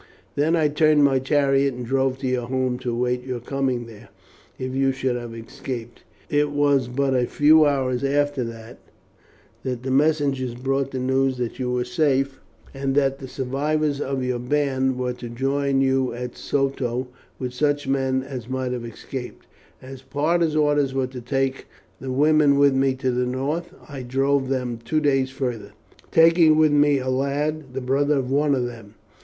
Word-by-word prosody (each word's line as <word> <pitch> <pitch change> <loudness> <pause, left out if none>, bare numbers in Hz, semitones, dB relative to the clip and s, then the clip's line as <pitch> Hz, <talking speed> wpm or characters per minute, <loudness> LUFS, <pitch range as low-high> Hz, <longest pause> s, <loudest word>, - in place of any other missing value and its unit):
Then 155 +4 +2
I 160 -2 +3
turned 150 0 +3
my 135 -2 +4
chariot 135 -1 +2
and 125 0 -6
drove 130 +1 0
to 130 - -1
your 125 -2 -1
home 130 -1 -1
to 130 -1 -4
await 125 +1 -1
your 125 -1 -4
coming 130 -1 -2
there 115 -1 -13 0.5
if 130 0 -4
you 135 0 +2
should 130 -1 -1
have 120 -1 -6
escaped. 120 0 -7 0.3
It 145 0 +1
was 145 -3 +2
but 135 +2 0
a 125 -1 +1
few 155 +1 +5
hours 130 -3 0
after 145 -1 +1
that 115 +1 -9 0.8
the 130 0 -3
messengers 140 -3 +1
brought 135 +2 -1
the 130 - -5
news 130 0 +1
that 125 0 -4
you 125 -1 -1
were 125 0 0
safe, 135 +1 0 0.3
and 135 0 -2
that 135 -1 +2
the 130 - -7
survivors 140 +3 -1
of 135 -2 -2
your 125 -1 -1
band 130 0 0
were 125 -1 -1
to 120 -1 -8
join 135 +2 0
you 130 -2 +1
at 125 0 -6
Soto 130 -3 -1 0.3
with 125 -1 -4
such 145 +2 0
men 130 -1 0
as 130 -3 -7
might 130 -1 -2
have 125 -1 -4
escaped. 125 +2 -8 0.4
As 130 0 -10
Parta's 155 +3 0
orders 145 -3 +2
were 135 -1 +1
to 125 -1 -8
take 135 +2 -2 0.3
the 130 -1 -5
women 145 +1 +4
with 140 -1 +5
me 135 0 +2
to 130 0 -1
the 125 0 0
north, 145 +7 -2 0.2
I 140 -3 -7
drove 135 +2 0
them 125 -3 -2
two 155 +6 0
days 135 -3 +1
farther, 120 -6 -4 0.4
taking 165 -1 +5
with 155 -1 +4
me 145 -1 +4
a 130 -1 -4
lad, 140 +1 -2
the 135 - -2
brother 140 +3 +1
of 130 -1 -2
one 145 0 +2
of 125 -2 -1
them. 115 -4 -9
135 Hz, 180 wpm, -23 LUFS, 125-145 Hz, 0.8 s, few